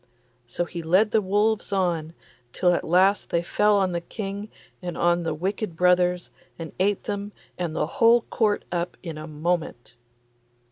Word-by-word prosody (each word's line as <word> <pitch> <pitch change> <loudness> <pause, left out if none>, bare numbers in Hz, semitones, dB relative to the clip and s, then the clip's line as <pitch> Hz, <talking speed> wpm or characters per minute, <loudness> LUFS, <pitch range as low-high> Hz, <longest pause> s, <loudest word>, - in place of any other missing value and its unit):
So 175 +8 -2
he 170 0 -6
led 185 +6 +3
the 220 - +3
wolves 205 +2 0
on, 170 -4 -1 0.4
till 180 -1 +3
at - - -1
last 190 +4 +3
they 170 0 0
fell 210 +4 +2
on 190 -2 +1
the 170 -1 -2
King 200 +2 -6 0.3
and 175 -2 -5
on 175 0 +2
the 165 -2 -2
wicked 190 +2 -3
brothers, 180 0 +2 0.3
and 165 -2 -7
ate 200 +1 +1
them 205 0 -4 0.2
and 170 -3 -3
the - - +1
whole 235 +1 +4
Court 215 -2 0
up 175 0 -3
in 165 -4 -6
a 155 - -7
moment. 155 -5 -3
180 Hz, 170 wpm, -25 LUFS, 170-205 Hz, 0.4 s, whole